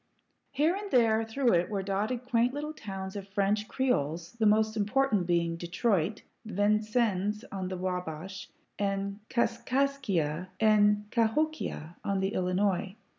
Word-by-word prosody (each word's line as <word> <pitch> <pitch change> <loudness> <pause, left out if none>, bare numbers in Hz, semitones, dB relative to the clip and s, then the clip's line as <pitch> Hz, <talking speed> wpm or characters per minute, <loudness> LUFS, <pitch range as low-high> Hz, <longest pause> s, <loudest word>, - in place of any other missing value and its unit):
Here 300 +6 +2
and 405 0 -5
there 225 - +4
through 235 +2 +1
it 175 0 +2
were 200 -2 -2
dotted 215 +6 -2
quaint 245 +1 +2
little 300 +1 -4
towns 195 -7 -6
of 200 -1 -6
French 205 +2 0
Creoles, 170 - -1
the 225 -2 +1
most 215 +1 +3
important 210 -2 +1
being 170 -1 +1
Detroit, 180 +2 0 0.2
Vincennes 210 0 +1
on 190 -2 -3
the 185 0 -4
Wabash, 180 0 -4 0.3
and 200 0 -1
Kaskaskia 235 - 0
and 210 -1 +4
Kahokia 230 - -1
on 200 -1 0
the 190 0 +1
Illinois. 185 +1 0
205 Hz, 130 wpm, -29 LUFS, 185-235 Hz, 0.3 s, there